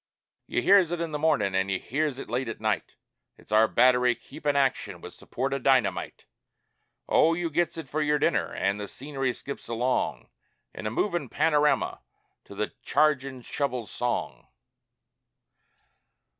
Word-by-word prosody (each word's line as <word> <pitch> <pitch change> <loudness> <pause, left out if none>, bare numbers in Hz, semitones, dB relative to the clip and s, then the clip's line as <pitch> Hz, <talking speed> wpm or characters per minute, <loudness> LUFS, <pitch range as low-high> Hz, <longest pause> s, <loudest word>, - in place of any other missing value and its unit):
You - - -1
hears 195 -4 +6
it 175 0 -3
in 170 -1 -3
the 150 - -3
mornin' 145 -11 +2
an' 95 +1 +1
you 95 - +1
hears 145 +5 -2
it - - -7
late 125 +3 -2
at 115 - -6
night 110 -2 -2 0.4
It's - - -19
our 110 +1 +5
battery 125 0 +4
keepin' 145 +4 -3
action 135 -2 0
with - - -10
support 135 +3 -4
o' 140 - -1
dynamite; 120 -9 +1 0.8
Oh, 165 +1 +4
you 170 -1 -2
gets 175 +2 0
it 160 -4 -6
for 155 +4 -2
your 150 0 +2
dinner, - - +1
an' 100 +1 0
the 105 0 -5
scenery 135 +2 -3
skips 140 +3 -8
along 120 +2 -1 0.4
In 105 - -5
a - - 0
movin' 170 - -1
panorama 150 +1 +2 0.5
to - - -12
the - - -3
chargin' 135 -4 +1
shovel's 125 -5 -3
song! 120 -1 -3
135 Hz, 155 wpm, -27 LUFS, 120-150 Hz, 0.8 s, hears